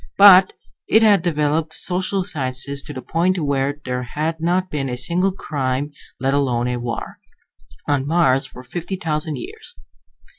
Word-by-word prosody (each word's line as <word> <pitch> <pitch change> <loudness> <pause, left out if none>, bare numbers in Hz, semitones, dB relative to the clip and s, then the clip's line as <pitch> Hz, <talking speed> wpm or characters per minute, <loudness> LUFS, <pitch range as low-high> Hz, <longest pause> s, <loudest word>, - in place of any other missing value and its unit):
But 195 -2 +8 0.3
it 220 +1 +5
had 205 -4 +5
developed 155 -1 0
social 185 +1 -1
sciences 140 -3 -2
to 150 - -9
the 130 -2 -7
point 180 +6 +1
where 140 -2 -1
there 125 -1 -2
had 155 +6 -3
not 180 +2 0
been 135 -3 -2
a 125 - -3
single 180 +9 +1
crime, 140 -5 -3 0.3
let 135 +1 0
alone 125 -4 +1
a 125 - -1
war, 120 -1 -5 0.7
on 140 -2 0
Mars 140 -5 +2
for 125 - -12
fifty 175 +8 -5
thousand 155 -3 -2
years. 120 - -10
150 Hz, 155 wpm, -20 LUFS, 135-175 Hz, 0.7 s, But